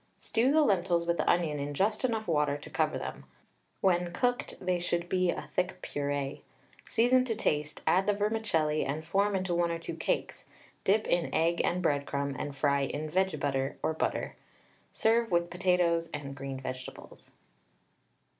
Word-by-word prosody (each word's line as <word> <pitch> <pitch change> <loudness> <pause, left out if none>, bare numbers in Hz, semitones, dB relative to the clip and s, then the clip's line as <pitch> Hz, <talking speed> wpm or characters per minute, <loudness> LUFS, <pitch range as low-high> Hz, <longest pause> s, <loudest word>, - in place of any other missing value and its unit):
Stew 245 +4 +1
the 310 +1 +5
lentils 175 -7 +2
with 170 0 +1
the - - +1
onion 160 -4 +2
in 145 +1 -4
just 210 - +1
enough 225 -4 0
water 150 -3 +2
to 145 - -11
cover - - +1
them; - - -6 0.6
when 175 -2 +2
cooked, 245 +5 0
they 180 -1 0
should 175 0 -1
be 185 0 +1
a - - -3
thick 180 0 0
purée. 145 -1 -3 0.5
Season 245 +2 +4
to 235 -3 -2
taste, 150 -7 -1
add 190 +3 +3
the 205 - +4
vermicelli, 200 -8 +1
and 155 +3 -3
form 200 +4 +1
into 185 -2 -1
1 170 0 +2
or 170 - -1
2 165 - -6
cakes, - - -2 0.4
dip 210 +3 +3
in 175 -1 +1
egg 170 +1 +2
and 180 +1 0
breadcrumb, 140 -2 0
and 145 -1 -4
fry 140 0 +2
in 150 +3 -3
vege 190 -3 +1
butter, 135 -1 -1
or 160 - +1
butter. 160 - -2 0.6
Serve 230 +1 +2
with 170 -1 +1
potatoes 175 -2 +2
and 140 -1 -6
green 135 -1 -6
vegetables. 130 -1 -8
170 Hz, 170 wpm, -30 LUFS, 145-195 Hz, 0.6 s, the